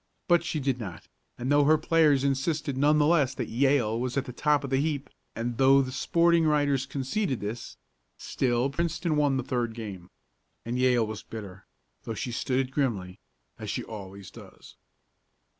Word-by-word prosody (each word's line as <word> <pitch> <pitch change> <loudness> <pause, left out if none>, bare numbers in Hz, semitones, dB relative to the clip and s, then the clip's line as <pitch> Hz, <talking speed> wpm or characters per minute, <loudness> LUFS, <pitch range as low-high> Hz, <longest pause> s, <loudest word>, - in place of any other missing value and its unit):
But 175 -2 +4
she 165 -2 -2
did 135 -2 -1
not, 90 -8 -8 0.3
and 125 +3 -2
though 145 0 +5
her 155 +2 +5
players 155 -3 +3
insisted, 140 +1 -1
none 145 +3 +3
the 150 - +4
less, 145 -5 +3
that 120 -4 -4
Yale 120 -3 +2
was 125 +1 -2
at 140 - 0
the 125 - -8
top 145 +2 +1
of 140 - -5
the 135 - +2
heap, 145 -2 -2 0.2
and 115 0 -3
though 135 +1 +6
the 130 - -5
sporting 170 +4 +2
writers 145 -3 +2
conceded 135 - -2
this, 110 +3 -6 0.4
still 125 +1 0
Princeton 170 +1 -1
won 145 -2 +2
the 130 - -2
third 120 -2 -2
game. 100 -6 -8 0.6
And 120 +2 -2
Yale 125 -3 +3
was 110 -1 -6
bitter, 95 -4 -9 0.3
though 115 - -5
she 120 +4 -4
stood 125 +2 -1
it 130 -1 -2
grimly, 105 -10 -2 0.4
as - - -6
she - - -2
always 100 -3 -9
does. - - -14
135 Hz, 180 wpm, -27 LUFS, 115-145 Hz, 0.6 s, though